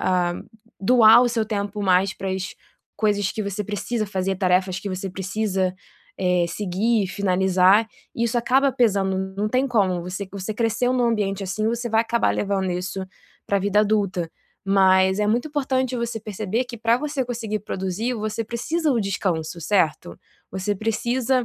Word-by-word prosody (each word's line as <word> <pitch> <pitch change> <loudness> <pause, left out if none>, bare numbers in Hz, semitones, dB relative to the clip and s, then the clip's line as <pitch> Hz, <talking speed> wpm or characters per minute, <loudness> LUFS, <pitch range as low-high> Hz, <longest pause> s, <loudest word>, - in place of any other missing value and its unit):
a 180 -1 +1 0.5
doar 230 +2 +7
o 245 - +2
seu 230 -2 0
tempo 205 -1 -3
mais 190 0 +3
para 190 - -5
as 190 0 -4 0.4
coisas 205 -2 +1
que 215 - -3
você 200 +1 -3
precisa 210 +2 -2
fazer, 190 -1 -2
tarefas 185 0 +1
que 205 - -6
você 190 0 -4
precisa, 190 0 -1 0.4
eh, 180 -2 +2
seguir 205 +4 0
e - - -2
finalizar. 190 +2 +3 0.3
Isso 235 +1 0
acaba 265 +4 +3
pesando, 200 -6 +1 0.2
não 210 +1 0
tem 255 +4 +1
como. 195 -8 +1
Você 190 +2 -5
você 200 +2 -4
cresceu 235 +2 +1
em - - 0
um 245 - +2
ambiente 205 -4 0
assim, 200 +3 -2
você 235 +1 -1
vai 225 0 +3
acabar 235 0 +1
levando 195 -2 -1
isso 185 +2 -3 0.4
pra 200 - +1
vida 205 +2 +2
adulta. 200 -5 0 0.3
Mas 190 0 +4
é 210 - +1
muito 240 +8 +1
importante 260 -3 -1
você 235 -1 -3
perceber 215 +2 -2
que 245 -1 -8
para 230 +1 +3
você 285 -1 -2
conseguir 225 -3 -3
produzir, 195 +5 -3
você 215 0 -3
precisa 295 +7 -1
o 235 - +1
descanso, 180 -4 -2
certo? 160 - 0 0.4
Você 190 +2 -1
precisa 235 +4 0
205 Hz, 170 wpm, -23 LUFS, 190-230 Hz, 0.5 s, doar